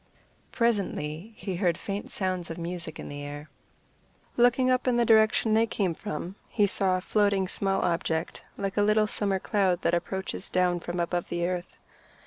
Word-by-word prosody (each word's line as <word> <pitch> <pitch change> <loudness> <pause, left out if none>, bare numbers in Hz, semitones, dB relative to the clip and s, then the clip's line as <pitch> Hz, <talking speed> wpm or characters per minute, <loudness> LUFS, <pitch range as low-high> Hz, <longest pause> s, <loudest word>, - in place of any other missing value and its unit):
Presently 200 -5 -1
he 195 -4 -4
heard 175 -3 +1
faint 200 0 -5
sounds 185 -3 -2
of 165 - -5
music 170 -2 -4
in - - -6
the 145 0 -6
air. 145 +1 -8 0.8
Looking 245 +1 +4
up 255 +1 +1
in 245 -1 +3
the 240 - +3
direction 220 0 +4
they 225 +1 +4
came 195 -5 0
from, 165 +3 -5 0.2
he 210 - +3
saw 190 -2 +2
floating 200 0 +2
a - - -6
small 195 +1 0
object, 165 -1 -1
like 195 0 -3
a - - +4
little 215 +1 +4
summer 200 -2 0
cloud 190 -2 +1
that 170 - +2
approaches 190 +2 -2
down 180 -1 +2
from 175 +1 -4
above 175 0 -1
the 175 0 -1
earth. 180 0 -4
190 Hz, 175 wpm, -27 LUFS, 175-210 Hz, 0.8 s, Looking